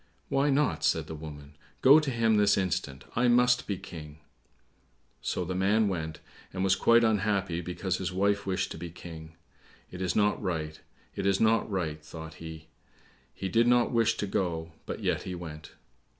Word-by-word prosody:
"Why 140 +2 +2
not?" 135 - +1
said 80 0 +2
the 80 - -7
woman; 75 -2 -9 0.3
"go 140 +4 +9
to 150 -3 -2
him 115 -3 +2
this 105 0 +4
instant; 90 -7 -2
I 125 +1 +3
must 125 +1 +4
be 100 - -2
King!" 80 -5 -10 1.0
So - - -2
the 95 - -3
man 100 +4 +2
went, 80 -4 -4 0.3
and 95 0 -2
was 95 -1 +4
quite 115 +3 +5
unhappy 100 -5 +1
because 90 +1 -3
his 95 -1 -2
wife 100 +2 +1
wished 95 -1 -1
to - - -7
be 85 +1 -6
King. 80 -1 -10 0.6
"It 90 - -7
is 90 -1 -1
not 105 0 +2
right; 80 -5 -3 0.3
it 95 - -1
is 95 -1 +2
not 110 0 +3
right," 80 -6 -3
thought 80 0 -9
he. 80 -1 -8 0.7
He 95 - -5
did 115 +6 +3
not 120 0 +4
wish 115 -2 +2
to - - -1
go, 85 -4 -2 0.2
but - - -5
yet - - +1
he 90 - -5
went. 80 -3 -9
95 Hz, 180 wpm, -29 LUFS, 80-110 Hz, 1.0 s, go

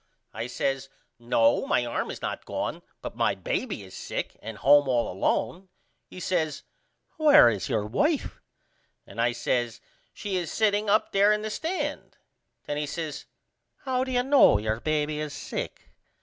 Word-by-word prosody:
I 115 - -4
says 135 +1 -2 0.3
No 120 -1 +2
my 120 - +2
arm 120 - -2
is - - -7
not - - -3
gone - - -3 0.2
but - - -6
my - - +1
baby - - -3
is - - -12
sick - - -4
and 110 0 -7
home 145 +3 +5
all 120 -2 +1
alone. 125 - -1 0.4
He - - -10
says 165 -5 -1 0.5
Where 295 - +7
is 105 +2 -4
your 110 -5 0
wife? 290 - 0 0.6
And 115 - -5
I 120 +1 +3
says 120 -1 -1 0.3
She 200 -3 -3
is 175 -3 -3
setting 210 -1 +1
up 215 +2 +2
there 200 +1 +5
in 210 0 +1
the 215 - -3
stand. 330 - -3 0.5
Then 145 - -3
he 150 0 -2
says 155 -1 -5 0.6
How 255 -1 +1
do 260 - -4
you 245 -1 +2
know 270 - +6
your 110 +2 -2
baby 150 +1 -1
is 150 -1 -4
sick? - - -6
150 Hz, 165 wpm, -27 LUFS, -, 0.6 s, Where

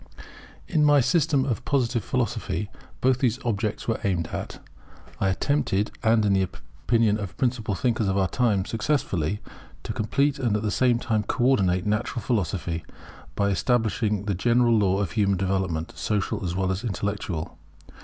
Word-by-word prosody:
In 155 -4 +2
my 145 -1 +6
System 145 0 +2
of 120 -6 -2
Positive 125 -5 0
Philosophy 110 -4 -2 0.3
both 130 0 +3
these 125 -3 +1
objects 110 -2 -2
were 115 - 0
aimed 90 -5 0
at. - - -6 0.6
I 95 - +2
attempted, 105 -1 0
and 110 -2 +3
in 100 - +3
the 95 - +3
opinion 105 - 0
of 100 - -3
the - - -17
principal 120 -6 -1
thinkers 115 +1 0
of 95 0 +1
our 95 -1 +2
time 105 -1 +1
successfully, 105 - -1 0.4
to - - -4
complete 140 +6 0
and 115 -5 +1
at 105 - -4
the 105 - 0
same 125 +2 +3
time 115 -3 0
co 120 +4 -2
ordinate 95 -9 +2
Natural 105 +3 -1
Philosophy, 85 -7 -1 0.5
by 100 0 +1
establishing 110 -1 0
the 100 - 0
general 120 +4 +3
law 95 -3 +2
of 100 - -2
human 100 -4 +2
development, 95 -4 -1
social 100 +6 -1
as 90 -1 -2
well 95 0 0
as 95 +3 -3
intellectual. 95 -6 -3
105 Hz, 165 wpm, -25 LUFS, 95-120 Hz, 0.6 s, my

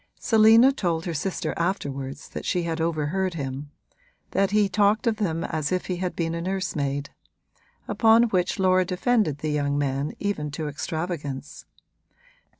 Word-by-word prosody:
Selina 225 +3 +6
told 170 -10 -1
her 175 - -2
sister 175 +5 -2
afterwards 140 -6 -3
that - - -6
she 180 - 0
had 165 -1 -2
overheard 165 +3 -1
him 140 -1 -5 0.6
that 195 -1 +2
he 210 0 +3
talked 205 +4 +2
of 225 -2 +1
them 165 -6 -1
as 155 -1 -2
if 185 0 0
he 180 - -3
had 180 0 -3
been 165 -1 -1
a 170 - -3
nursemaid; 150 -7 -2 0.8
upon 225 0 +5
which 180 -3 0
Laura 185 -1 +3
defended 185 - +1
the 155 +1 -3
young 145 -1 0
man 140 0 -1
even 200 -8 -2
to 150 +1 -4
extravagance. 150 -2 -5
170 Hz, 150 wpm, -25 LUFS, 150-195 Hz, 0.8 s, Selina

